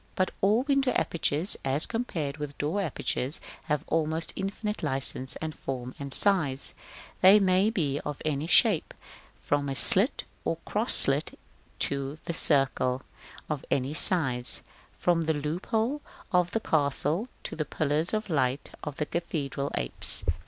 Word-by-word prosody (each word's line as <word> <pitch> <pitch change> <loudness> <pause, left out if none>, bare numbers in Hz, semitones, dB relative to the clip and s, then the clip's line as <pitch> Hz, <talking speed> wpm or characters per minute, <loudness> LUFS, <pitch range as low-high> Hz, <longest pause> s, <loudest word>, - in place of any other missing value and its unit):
But 185 - -1
all 210 +6 +2
window 275 -2 0
apertures, 165 +2 -1
as 135 +3 -1
compared 165 - -5
with 150 -1 -8
door 155 +8 -2
apertures, 145 -4 -3 0.3
have 150 -2 -2
almost 160 0 -2
infinite 210 +2 -5
licence 130 -2 -3
of 160 -1 -6
form 130 -3 -7
and 140 -1 -7
size: 145 -6 +8 0.5
they 195 +3 +7
may 190 +1 +2
be 150 -10 -2
of 150 -1 -7
any 150 0 -3
shape, 195 -2 +2 0.5
from 145 0 -1
the 135 - -4
slit - - +5 0.2
or - - -2
cross - - 0
slit - - +4 0.4
to 140 +1 -2
the 170 - -4
circle; 135 -4 +1 0.4
of 150 -3 -5
any 135 +2 -2
size, 130 -8 +4 0.3
from 175 -1 0
the 160 -1 -1
loophole 220 - -3 0.3
of 180 -1 +1
the 225 - -2
castle 155 - -1 0.2
to - - -7
the 155 - -3
pillars 155 +2 -2
of 215 0 -3
light 140 -5 -2
of 150 -2 -7
the 150 - -2
cathedral 145 -5 -4
apse. 60 0 -2
155 Hz, 145 wpm, -26 LUFS, 140-185 Hz, 0.5 s, size